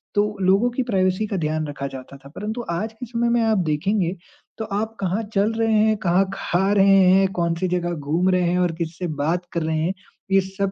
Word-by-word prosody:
तो 205 - +4 0.2
लोगों 195 +6 +4
की 245 +2 -2
प्राइवेसी 185 0 +1
का 200 - -3
ध्यान 155 -1 -1
रखा 140 -1 -5
जाता 135 +1 -10
था। 140 0 -15
परंतु 210 +9 -5
आज 210 +6 -2
के 250 +3 -8
समय 235 0 -1
में 235 0 +2
आप 220 -1 +2
देखेंगे 175 +4 0 0.4
तो 220 - -4
आप 215 +2 -3
कहाँ 190 +3 -1
चल 205 +2 +2
रहे 225 0 +1
हैं, 215 0 +3
कहाँ 185 0 +2
खा 190 +1 0
रहे 195 -1 +5
हैं, 195 +1 +5
कौन-सी 170 +1 -1
जगह 175 -1 -1
घूम 165 +4 0
रहे 185 -1 +2
हैं 180 - +1
और 180 -1 +2
किससे 170 +1 -4
बात 170 +4 0
कर 170 - -1
रहे 160 0 -1
हैं, 165 +4 0 0.4
ये 195 0 +5
सब 195 +1 -3
190 Hz, 220 wpm, -22 LUFS, 170-215 Hz, 0.4 s, रहे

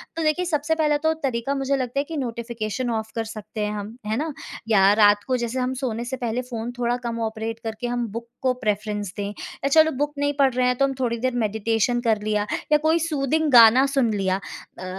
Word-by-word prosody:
तो 330 - -2
देखिए, 310 +4 +1
सबसे 315 -1 0
पहला 300 -2 +2
तो 320 - +3
तरीका 260 +1 -1
मुझे 275 0 0
लगता 255 +1 -2
है - - +1
कि 325 - -4
नोटिफ़िकेशन 235 -1 -3
ऑफ 220 0 -8
कर 225 - -1
सकते 215 0 -7
है 210 - -2
हम, 210 +2 -6
है 215 +1 -1
ना। 310 +2 -2 0.4
या 195 -3 +6
रात 205 0 +5
को 255 -1 +1
जैसे 240 +1 -2
हम 255 +1 -1
सोने 235 -2 -2
से 260 +2 -4
पहले 240 0 -2
फ़ोन 230 0 -4
थोड़ा 240 0 +1
कम 230 0 -3
ऑपरेट 220 +1 -5
करके 225 +1 -4
हम 240 -1 -1
बुक 230 +2 -6
को 260 -1 +2
प्रेफरेंस 210 -2 -2
दें। 200 -1 -2
या 210 +6 -6
चलो 315 +2 +5
बुक 290 +2 -2
नहीं 285 0 0
पढ़ 270 -2 +4
रहे 255 - +3
हैं, 250 - +2
तो 275 - +4
हम 270 - -1
थोड़ी 235 -2 0
देर 255 +1 -1
मेडिटेशन 225 +2 0
कर 220 -3 +1
लिया, 210 -1 0 0.3
या 300 - +7
कोई 315 +2 +2
सूथिंग 310 -1 0
गाना 240 +2 +8
सुन 270 -4 +1
लिया 190 -2 0 0.4
अ, 185 - -6
240 Hz, 230 wpm, -23 LUFS, 220-275 Hz, 0.4 s, गाना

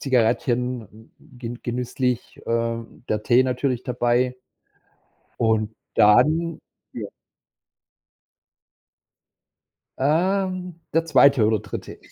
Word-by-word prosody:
Zigarettchen 120 -3 -1
gen 120 -2 -9
genüsslich, 125 0 -2
ähm, 115 0 -3
der 105 0 -1
Tee 125 +3 +4
natürlich 125 -1 -1
dabei. 125 +1 +1 1.0
Und 110 -1 +1 0.2
dann 155 +10 +4 0.4
der - - -5 2.9
Ähm, 180 +3 0
der 165 +1 +2
2. 135 -6 +5
oder 110 0 +2
3.. 105 - -8
125 Hz, 80 wpm, -23 LUFS, 115-140 Hz, 2.9 s, 2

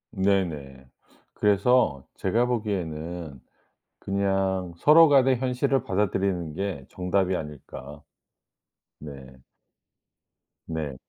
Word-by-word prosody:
네네. 80 -9 -1 0.5
그래서 100 - +2
제가 115 +6 +1
보기에는 85 - -4 0.6
그냥 95 -2 -1
서로 160 - +7
간의 135 -3 +4
현실을 130 +1 0
받아들이는 95 -4 -1
게 95 -7 -4
정답이 90 0 0
아닐까. 75 -1 -8 1.0
네. 75 -2 -8 1.5
네. 80 -4 -4
95 Hz, 185 characters per minute, -26 LUFS, 80-105 Hz, 1.5 s, 서로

